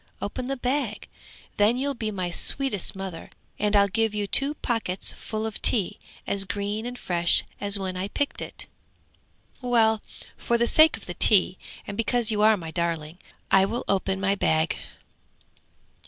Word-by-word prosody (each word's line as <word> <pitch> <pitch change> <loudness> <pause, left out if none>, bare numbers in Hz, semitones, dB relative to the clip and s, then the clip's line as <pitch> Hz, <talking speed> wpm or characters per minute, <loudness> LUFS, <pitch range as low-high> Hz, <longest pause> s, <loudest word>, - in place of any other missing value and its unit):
Open 250 +5 -4
the 275 0 -2
bag! 250 -3 -2 0.5
then 210 +4 +4
you'll 280 +2 -1
be 225 -4 -3
my 185 -4 -3
sweetest 235 0 0
mother, 190 -4 -7 0.3
and 210 0 +1
I'll 200 0 +6
give 220 +1 0
you 205 -1 0
two 275 +8 +1
pockets 225 -9 -1
full 215 0 -5
of 220 -1 -5
tea 205 -7 +2 0.3
as 200 -1 -1
green 205 +3 -3
and 245 0 -6
fresh 175 -5 +2 0.2
as 200 0 +3
when 190 -2 -4
I 185 +2 -2
picked 285 +7 -2
it!' - - -6 1.0
'Well, 225 -3 +3 0.3
for 235 - 0
the 235 - +2
sake 315 +5 +5
of 225 - -14
the 175 - -5
tea, 185 -1 +3 0.3
and 200 - -6
because 230 +1 +1
you 210 -1 0
are 215 0 +5
my 165 -3 -7
darling, 165 -1 -3 0.3
I 190 0 +6
will 235 +5 -3
open 190 -1 0
my 195 0 +2
bag!' 160 -5 +1
205 Hz, 170 wpm, -25 LUFS, 190-235 Hz, 1.0 s, I'll